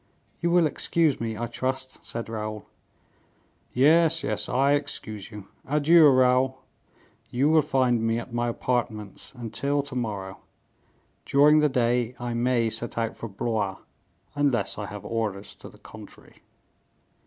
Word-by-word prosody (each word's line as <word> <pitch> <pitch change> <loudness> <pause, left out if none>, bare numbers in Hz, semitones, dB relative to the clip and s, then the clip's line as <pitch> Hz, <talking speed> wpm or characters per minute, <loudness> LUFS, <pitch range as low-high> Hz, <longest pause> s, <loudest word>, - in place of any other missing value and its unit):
"You 170 - 0
will 175 -1 +4
excuse 155 -1 +1
me, 110 -1 -3
I 120 - -2
trust," 130 +2 -4
said 115 0 -5
Raoul. 110 -1 -5 1.1
"Yes, 160 +5 +4
yes, 105 0 -2
I 135 +2 +2
excuse 120 -8 -4
you; 105 -3 -10 0.2
adieu, 150 +2 +5
Raoul; 130 0 +3 0.7
you 135 +5 +1
will 160 0 +5
find 130 -5 +1
me 115 0 0
at 120 +1 -7
my 120 0 0
apartments 115 -4 -3
until 140 +4 -2
to 140 -2 -8
morrow; 100 -6 -4 0.8
during 150 +2 +5
the 150 0 +3
day 120 -1 0
I 120 -1 -3
may 120 -1 +1
set 115 +2 -4
out 115 -1 -1
for 115 - -7
Blois, 100 -1 -2 0.6
unless 135 -9 0
I 105 - -4
have 105 -1 -9
orders 105 -4 -3
to - - -11
the - - -18
contrary." - - -14
120 Hz, 145 wpm, -26 LUFS, 110-140 Hz, 1.1 s, adieu